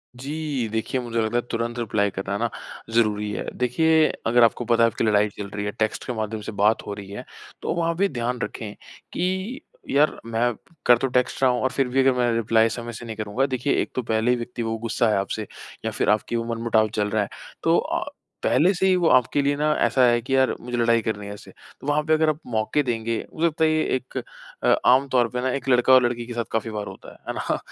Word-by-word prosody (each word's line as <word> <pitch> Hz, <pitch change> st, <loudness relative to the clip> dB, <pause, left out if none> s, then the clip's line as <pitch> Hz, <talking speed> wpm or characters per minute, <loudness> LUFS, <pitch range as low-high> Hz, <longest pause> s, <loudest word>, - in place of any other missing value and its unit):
जी, 140 Hz, -1 st, -3 dB
देखिए 110 Hz, +3 st, -1 dB
मुझे 115 Hz, -1 st, -2 dB
लगता 110 Hz, +1 st, -2 dB
है, -, -, +2 dB
तुरंत 115 Hz, +1 st, -2 dB
रिप्लाई 105 Hz, -3 st, +1 dB
कराना 95 Hz, +1 st, -3 dB
ना -, -, 0 dB, 0.4 s
ज़रूरी 105 Hz, -2 st, +1 dB
है। -, -, -4 dB
देखिए, 155 Hz, +6 st, +3 dB, 0.2 s
अगर 120 Hz, +1 st, +5 dB
आपको 115 Hz, +1 st, +2 dB
पता 115 Hz, 0 st, +3 dB
है 115 Hz, -, +5 dB
आपकी -, -, -3 dB
लड़ाई 105 Hz, -1 st, +3 dB
चल 100 Hz, -, -5 dB
रही 105 Hz, 0 st, -4 dB
है, 105 Hz, -, -2 dB
टेक्स्ट 110 Hz, 0 st, -2 dB
के 125 Hz, -, -2 dB
माध्यम 110 Hz, -1 st, -3 dB
से 105 Hz, -, -6 dB
बात 105 Hz, +2 st, +2 dB
हो 105 Hz, -, -3 dB
रही 100 Hz, -1 st, -9 dB
है, 100 Hz, -, -7 dB, 0.4 s
तो -, -, -1 dB
वहाँ 170 Hz, -1 st, 0 dB
पे 200 Hz, +4 st, +2 dB
ध्यान 125 Hz, -2 st, -2 dB
रखें 105 Hz, 0 st, -5 dB, 0.4 s
कि 190 Hz, +8 st, -2 dB, 0.3 s
यार! 145 Hz, +2 st, +2 dB
मैं 115 Hz, +1 st, 0 dB, 0.3 s
कर 120 Hz, -, +7 dB
तो 135 Hz, -, -1 dB
टेक्स्ट 125 Hz, +1 st, 0 dB
रहा 130 Hz, -, +6 dB
हूँ, 125 Hz, -, -1 dB
और 130 Hz, -, +1 dB
फिर 135 Hz, -2 st, 0 dB
भी 125 Hz, +2 st, 0 dB
अगर 135 Hz, 0 st, +5 dB
मैं 120 Hz, -1 st, +2 dB
रिप्लाई 115 Hz, 0 st, +3 dB
समय 120 Hz, +1 st, -6 dB
से 115 Hz, +2 st, -8 dB
नहीं 110 Hz, -1 st, -6 dB
करूँगा। 110 Hz, +5 st, -1 dB
देखिए, 130 Hz, +1 st, -1 dB
एक -, -, -4 dB
तो 130 Hz, -, 0 dB
पहले 110 Hz, +1 st, +1 dB
ही 125 Hz, -, +2 dB
व्यक्ति 120 Hz, 0 st, -5 dB
वो 115 Hz, 0 st, -2 dB
गुस्सा 115 Hz, 0 st, 0 dB
है 105 Hz, -, +2 dB
आपसे 100 Hz, +2 st, -3 dB, 0.4 s
या -, -, 0 dB
फिर -, -, 0 dB
आपकी 105 Hz, +2 st, +1 dB
वो 115 Hz, -, 0 dB
मनमुटाव 115 Hz, -1 st, +2 dB
चल 105 Hz, -1 st, 0 dB
रहा 110 Hz, +1 st, +1 dB
है। 100 Hz, -, -7 dB, 0.3 s
तो -, -, +4 dB
अ, -, -, -1 dB, 0.4 s
पहले 180 Hz, +5 st, +4 dB
से 190 Hz, +1 st, +1 dB
ही 185 Hz, -, +4 dB
वो 175 Hz, -2 st, +2 dB
आपके 130 Hz, +3 st, +3 dB
लिए 140 Hz, +1 st, +1 dB
ना 150 Hz, +1 st, +2 dB
ऐसा 120 Hz, +2 st, +3 dB
है 120 Hz, 0 st, +3 dB
कि 135 Hz, +3 st, -1 dB
यार! 130 Hz, 0 st, +3 dB
मुझे 120 Hz, 0 st, -4 dB
लड़ाई 115 Hz, -1 st, +3 dB
करनी 105 Hz, -2 st, -3 dB
है 100 Hz, -, -6 dB
उससे। 105 Hz, -, -12 dB, 0.3 s
वहाँ 145 Hz, +2 st, +1 dB
पे 155 Hz, +1 st, +2 dB
अगर 155 Hz, 0 st, +3 dB
आप 155 Hz, 0 st, -1 dB
मौके 110 Hz, +4 st, 0 dB
देंगे, 115 Hz, -2 st, -1 dB, 0.2 s
हो 160 Hz, -, -8 dB
सकता 160 Hz, -1 st, +2 dB
है 160 Hz, -, +5 dB
ये 155 Hz, 0 st, +2 dB
एक 130 Hz, 0 st, -6 dB, 0.7 s
आम 130 Hz, +2 st, +5 dB
तौर 125 Hz, -2 st, +3 dB
पे 125 Hz, +1 st, -3 dB
ना 130 Hz, -, 0 dB
एक 140 Hz, -, -4 dB
लड़का 125 Hz, +1 st, +5 dB
और 130 Hz, -1 st, +7 dB
लड़की 120 Hz, -1 st, -1 dB
के 120 Hz, -, -7 dB
साथ 120 Hz, 0 st, -1 dB
काफ़ी 115 Hz, 0 st, -1 dB
बार 105 Hz, -1 st, -4 dB
होता -, -, -10 dB
है। -, -, -16 dB
है -, -, -2 dB
ना? -, -, -1 dB
120 Hz, 250 wpm, -24 LUFS, 110-135 Hz, 0.7 s, कर